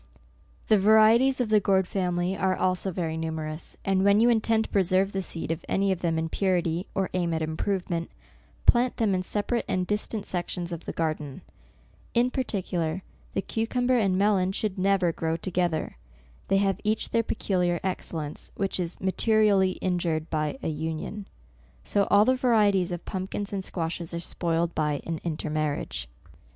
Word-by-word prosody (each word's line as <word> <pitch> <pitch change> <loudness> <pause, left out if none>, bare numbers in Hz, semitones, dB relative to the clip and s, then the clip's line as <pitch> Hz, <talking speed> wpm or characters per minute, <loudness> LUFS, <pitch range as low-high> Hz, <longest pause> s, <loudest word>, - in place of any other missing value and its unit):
The 215 - +5
varieties 220 +6 +5
of 245 -3 0
the 215 -1 +5
gourd 190 -2 +2
family 180 -1 -1
are 190 -1 +1
also 185 +1 0
very 165 -3 -2
numerous, 160 -1 -5
and 190 -1 +2
when 200 +1 +5
you 235 +2 +5
intend 225 -1 +3
to - - -8
pre 200 - +3
serve 190 +2 +2
the 195 - -2
seed 165 -3 -4
of 165 +1 -3
any 195 0 +2
of 185 -2 -2
them 165 -2 0
in 160 0 -1
purity, 175 -1 0
or 195 -1 0
aim 175 -2 0
at 160 - -1
improvement, 170 +1 -2 0.6
plant 245 +1 +4
them 215 -4 +2
in 185 - +1
separate 210 +5 -1
and 185 -1 0
distant 210 +1 -2
sections 175 -1 -3
of 170 -1 -6
the - - -3
garden. 155 -4 -3 0.7
In 245 +2 +3
par 260 - 0
ticular, 180 -5 -2 0.3
the 195 - 0
cucumber 245 +3 0
and 195 -6 +2
melon 195 -2 +2
should 195 -2 -2
never 190 -2 +3
grow 160 0 -2
together. 175 - -1 0.5
They 195 - +3
have 195 -1 +1
each 215 +1 0
their 230 - +3
pecu 205 -4 -2
liar 175 -1 +1
excellence, 165 -5 -4
which 195 -1 -1
is 175 -1 -3
materially 200 -1 +3
injured 170 -4 -1
by 155 - -1
an 160 - -1
union. 160 +6 -4 0.6
So 200 -1 +1
all 205 +1 +6
the 255 - +4
varieties 210 -8 +3
of 175 -1 -5
pumpkins 195 +2 -4
and 195 -1 -2
squashes 170 -1 -4
are - - -2
spoiled 170 0 -1
by 150 -2 0
an 165 -1 -3
intermar 155 -2 -1
riage. - - -5
185 Hz, 175 wpm, -27 LUFS, 165-205 Hz, 0.7 s, all